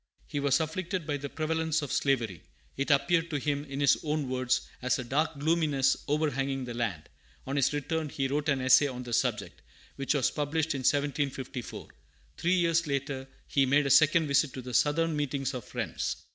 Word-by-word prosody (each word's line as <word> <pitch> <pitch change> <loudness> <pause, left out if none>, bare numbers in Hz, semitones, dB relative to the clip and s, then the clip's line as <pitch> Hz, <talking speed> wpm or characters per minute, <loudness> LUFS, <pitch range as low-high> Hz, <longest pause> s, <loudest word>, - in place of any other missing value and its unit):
He 145 - -4
was 140 0 +2
afflicted 170 +2 -3
by 145 -2 -1
the 140 0 -6
prevalence 160 0 -1
of 145 - -5
slavery. 115 - 0 0.3
It 140 +2 -2
appeared 165 +4 +3
to 150 - -1
him, 145 0 -1
in 140 -1 -6
his 140 - +4
own 150 -2 -1
words, 130 0 +1 0.2
"as 125 0 +1
a 125 - -4
dark 145 +5 -1
gloominess 145 -3 +2
overhanging 140 -3 0
the 120 - -6
land." 115 -10 -3 0.4
On 135 - -3
his 140 -2 +3
return, 150 +2 -2
he 135 -1 -1
wrote 145 +3 -1
an 135 -2 +1
essay 130 +3 +6
on 125 -2 -6
the 120 -1 -6
subject, 115 -6 -1 0.4
which 140 +2 0
was 135 -3 +2
published 155 +1 -1
in 135 - -3
1754. 140 -2 -2 0.5
Three 175 +2 +1
years 170 -2 +2
after, 135 -1 -2 0.2
he 135 -2 +2
made 145 +2 +3
a 140 - +1
second 155 +2 +5
visit 140 -1 +2
to 130 - -7
the 125 0 -7
Southern 160 +5 +2
meetings 140 -2 -2
of 125 -4 -6
Friends. - - -3
140 Hz, 190 wpm, -29 LUFS, 130-155 Hz, 0.5 s, essay